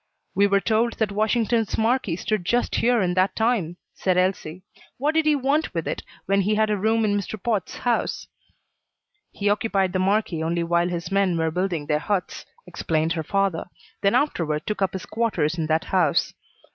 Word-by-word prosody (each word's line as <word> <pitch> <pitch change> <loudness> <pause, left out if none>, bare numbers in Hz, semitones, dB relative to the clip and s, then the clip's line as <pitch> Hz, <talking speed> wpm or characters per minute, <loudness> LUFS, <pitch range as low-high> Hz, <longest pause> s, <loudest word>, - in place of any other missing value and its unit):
"We 200 +1 +4
were 200 0 +3
told 225 +3 +1
that 220 -3 -1
Washington's 220 +1 +1
marquee 225 -5 +1
stood 215 +1 -2
just 240 +7 0
here 235 -2 +3
in 180 -1 0
that 185 +1 +1
time," 220 -7 0 0.2
said 185 -1 0
Elsie. 185 -2 -1 0.3
"What 290 +4 0
did 320 -1 +2
he 300 - +5
want 280 - 0
with 165 - -2
it - - -3 0.2
when 195 +1 +2
he 210 +3 +1
had 215 0 +2
a - - +2
room 220 +3 +1
in 205 -1 +1
Mr. 205 +1 -3
Potts' 210 -2 -2
house?" 245 -1 -1 1.1
"He 205 - -3
occupied 200 -3 +1
the 185 - 0
marquee 190 -3 +1
only 170 +1 0
while 170 +1 +1
his 175 +1 -4
men 195 -3 +2
were 160 0 0
building 175 -3 -2
their 150 0 +1
huts," 195 +2 -3 0.2
explained 160 0 -1
her 165 - -2
father, 195 0 0 0.3
"then 200 +3 +3
afterward 165 - 0
took 210 -2 -3
up 190 -1 +1
his 190 - -5
quarters 175 -8 -1
in 155 - -1
that 160 +1 +1
house." 175 -6 +2
195 Hz, 190 wpm, -24 LUFS, 175-220 Hz, 1.1 s, he